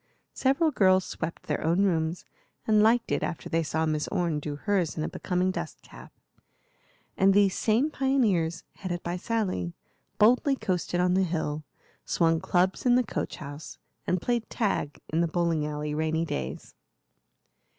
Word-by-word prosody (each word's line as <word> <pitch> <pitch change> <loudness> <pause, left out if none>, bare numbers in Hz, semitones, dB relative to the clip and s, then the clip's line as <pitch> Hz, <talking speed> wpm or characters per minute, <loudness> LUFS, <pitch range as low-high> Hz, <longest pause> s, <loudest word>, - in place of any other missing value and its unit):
Several 275 +4 +2
girls 185 -6 +4
swept 165 0 -5
their - - -2
own 170 +5 +2
rooms, 165 -3 0 0.4
and 215 -1 +4
liked 230 +2 +3
it - - +1
after 165 - -4
they 165 - +1
saw 160 +1 -1
Miss 155 -1 -1
Orne 170 -4 0
do 145 0 -5
hers 180 0 -1
in 155 - -1
a - - -1
becoming 185 0 -1
dust 170 -4 -6
cap; - - -13 1.0
and 195 0 +4
these 200 -2 +4
same 235 +8 +2
pioneers, 210 - +1
headed 175 -3 -4
by 175 +1 -2
Sally, 185 - -2 0.4
boldly 250 +6 +4
coasted 180 -6 -2
on 180 0 +3
the 190 - +3
hill, 155 -4 -2 0.4
swung 165 -1 +2
clubs 185 +3 +1
in 245 -1 +4
the 250 - +4
coach 215 - -4
house, 145 +1 -9 0.3
and 180 - +1
played 240 -2 -1
tag 195 - -1
in 160 +2 +1
the 170 - +2
bowling 165 -2 0
alley 150 0 -3
rainy 160 +2 0
days. 65 - -5
175 Hz, 160 wpm, -27 LUFS, 160-205 Hz, 1.0 s, girls